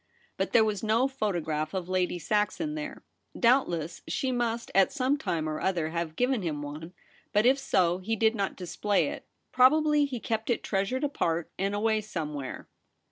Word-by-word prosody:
But -, -, -2 dB
there 225 Hz, -2 st, +5 dB
was 210 Hz, -3 st, -1 dB
no 225 Hz, +4 st, +2 dB
photograph 170 Hz, -, -2 dB
of 185 Hz, -2 st, -3 dB
Lady 185 Hz, -1 st, 0 dB
Saxon 210 Hz, -, 0 dB
there. 305 Hz, 0 st, -6 dB, 0.4 s
Doubt 250 Hz, +3 st, +4 dB
less 170 Hz, -1 st, -4 dB
she 265 Hz, -, -1 dB
must 235 Hz, -2 st, -1 dB
at 195 Hz, +4 st, +4 dB
some 270 Hz, 0 st, +1 dB
time 165 Hz, -, -2 dB
or 155 Hz, 0 st, -3 dB
other 170 Hz, -4 st, 0 dB
have 170 Hz, -1 st, -3 dB
given 250 Hz, +1 st, +1 dB
him 150 Hz, -5 st, -3 dB
one; 155 Hz, +4 st, -7 dB, 0.4 s
but 210 Hz, +2 st, +3 dB
if 265 Hz, +2 st, +5 dB
so, 185 Hz, -10 st, +2 dB
he 220 Hz, +4 st, -1 dB
did 220 Hz, +1 st, +3 dB
not 200 Hz, -4 st, -2 dB
display 195 Hz, +3 st, 0 dB
it; -, -, -8 dB, 0.2 s
probably 300 Hz, +3 st, +5 dB
he 260 Hz, -4 st, -4 dB
kept 225 Hz, 0 st, -3 dB
it 240 Hz, -, 0 dB
treasured 200 Hz, +7 st, -1 dB
apart 170 Hz, -, -1 dB
and 195 Hz, +1 st, 0 dB
away 215 Hz, +1 st, +1 dB
somewhere. 150 Hz, -9 st, -5 dB
210 Hz, 180 wpm, -28 LUFS, 170-250 Hz, 0.4 s, there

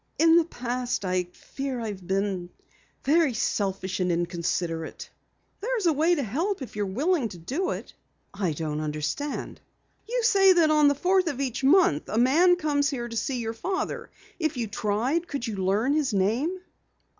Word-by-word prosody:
"In 325 Hz, 0 st, +6 dB
the 340 Hz, -, +4 dB
past 245 Hz, -6 st, -3 dB
I 180 Hz, -1 st, 0 dB
fear 265 Hz, +8 st, -6 dB
I've 205 Hz, -6 st, -6 dB
been 190 Hz, -2 st, -1 dB, 0.5 s
very 300 Hz, -3 st, +3 dB
selfish 190 Hz, -3 st, -1 dB
and 180 Hz, -1 st, +1 dB
inconsiderate." 170 Hz, -1 st, -2 dB, 0.5 s
"There's 455 Hz, -1 st, -1 dB
a 330 Hz, -, +4 dB
way 320 Hz, +4 st, +3 dB
to 290 Hz, -, -1 dB
help 315 Hz, -, -2 dB
if 250 Hz, -, -10 dB
you're 205 Hz, -1 st, -1 dB
willing 275 Hz, -, 0 dB
to 180 Hz, -, -10 dB
do 275 Hz, -, -2 dB
it." -, -, -5 dB, 0.4 s
"I 190 Hz, -5 st, -1 dB
don't 150 Hz, 0 st, -3 dB
understand." 155 Hz, -, -4 dB, 0.5 s
"You -, -, 0 dB
say 390 Hz, -4 st, +6 dB
that 330 Hz, -3 st, +4 dB
on 300 Hz, -1 st, +5 dB
the 285 Hz, -, +3 dB
fourth 370 Hz, +4 st, +2 dB
of 280 Hz, -5 st, -2 dB
each 270 Hz, -1 st, -2 dB
month 280 Hz, -, +4 dB
a 215 Hz, -, -2 dB
man 315 Hz, +10 st, +5 dB
comes 295 Hz, -4 st, +1 dB
here 245 Hz, -5 st, -3 dB
to 230 Hz, -, -7 dB
see 250 Hz, +3 st, -1 dB
your 225 Hz, -1 st, -3 dB
father. 375 Hz, -, -3 dB, 0.3 s
If 315 Hz, -4 st, -1 dB
you 235 Hz, -, -1 dB
tried 225 Hz, +11 st, -1 dB
could 280 Hz, -6 st, -4 dB
you 220 Hz, -4 st, -4 dB
learn 200 Hz, +8 st, +1 dB
his 290 Hz, -8 st, +1 dB
name?" 235 Hz, -, +1 dB
250 Hz, 175 wpm, -26 LUFS, 195-320 Hz, 0.5 s, In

